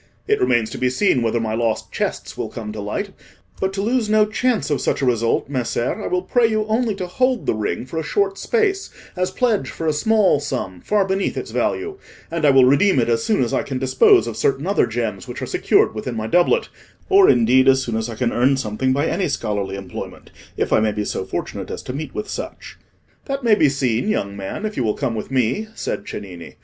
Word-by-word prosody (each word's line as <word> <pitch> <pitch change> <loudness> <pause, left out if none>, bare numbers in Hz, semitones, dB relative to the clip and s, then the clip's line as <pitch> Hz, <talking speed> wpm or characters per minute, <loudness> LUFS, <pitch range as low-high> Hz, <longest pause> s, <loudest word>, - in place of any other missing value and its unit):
It 425 -1 +2
remains 120 - +2
to - - -6
be 125 - +2
seen 130 0 +2
whether 115 0 +1
my 110 -1 -2
lost 115 -1 -1
chests - - -3
will - - -4
come 110 -2 -6
to 105 -1 -6
light; 195 - -3 0.5
but 190 - 0
to 195 0 -2
lose 230 0 0
no 215 0 +5
chance 220 -3 0
of 145 - 0
such - - 0
a - - +3
result, 115 -2 +1
Messer, 125 -3 -2
I - - -2
will 180 0 0
pray 235 +5 +3
you 215 -1 0
only 220 0 0
to 190 -2 -4
hold 255 +6 0
the - - +1
ring 105 -1 -3
for 160 +5 -4
a - - -3
short 195 +5 0
space 405 -4 0 0.3
as 185 0 0
pledge 220 - 0
for 165 - -6
a 155 - +2
small 200 +1 +3
sum 125 -11 -4
far 205 -2 +2
beneath 190 0 -1
its - - -5
value, 395 0 -2 0.3
and 165 -2 0
I - - +6
will 135 -2 +6
redeem 145 +8 +4
it 120 -2 +2
as 115 -1 +1
soon 215 -11 +2
as 120 - -2
I - - +2
can 135 - -4
dispose 130 -2 +4
of 115 -2 -5
certain 135 +2 0
other 200 +2 +2
gems 110 -4 -3
which - - -6
are - - -3
secured - - +2
within 115 +3 -5
my 110 -1 -3
doublet, 175 - +2 0.4
or 390 -1 +6
indeed 125 +3 +4
as 135 0 +5
soon 115 -3 -3
as 110 +1 -2
I 115 - -6
can 120 +1 -1
earn 130 +3 +3
something 130 +2 -1
by 140 +3 +1
any 185 +3 0
scholarly 100 -8 -2
employment, 95 -2 -8 0.3
if - - 0
I - - +5
may 110 -1 +1
be 105 0 -2
so - - -3
fortunate - - -5
as - - -6
to 125 - -6
meet 145 0 -6
with 210 - -3
such." - - -7 0.5
"That 275 -1 -3
may 230 -2 +4
be 155 -8 +4
seen, 130 - 0
young 100 - -1
man, 100 - -5
if 215 - -4
you 130 - +1
will 110 -2 0
come 115 - -2
with 110 - -5
me," 130 - 0
said - - -4
Cennini. 90 -5 -8
135 Hz, 235 wpm, -21 LUFS, -, 0.5 s, I